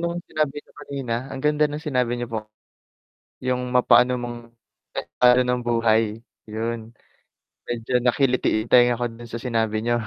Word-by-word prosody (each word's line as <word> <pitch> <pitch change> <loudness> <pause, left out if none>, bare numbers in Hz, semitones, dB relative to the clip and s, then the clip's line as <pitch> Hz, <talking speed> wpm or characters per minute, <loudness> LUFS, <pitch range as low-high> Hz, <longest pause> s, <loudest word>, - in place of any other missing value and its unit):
nung 170 0 -2
sinabi 150 -2 -1
niyo - - -26
kanina, 135 -5 -4
ang 135 0 -6
ganda 150 0 +3
ng 145 - -5
sinabi 125 -3 0
niyo 120 -1 -4
po. 110 - 0 1.1
Yung 125 0 -1
mapaano 125 0 +5
mang 120 -1 -5 0.8
a 125 0 +7
ano 125 - +4
ng 125 0 0
buhay 115 -2 +2 0.3
'yun, 115 +1 -4 0.8
medyo 120 +1 -3
nakiliti 125 -2 +2
yung 115 - -15
tenga 120 -1 +6
ko - - +1
do'n 115 +1 -11
sa 115 +1 -6
sinabi 110 -3 0
niyo. 120 +1 +1
120 Hz, 160 wpm, -23 LUFS, 115-125 Hz, 1.1 s, a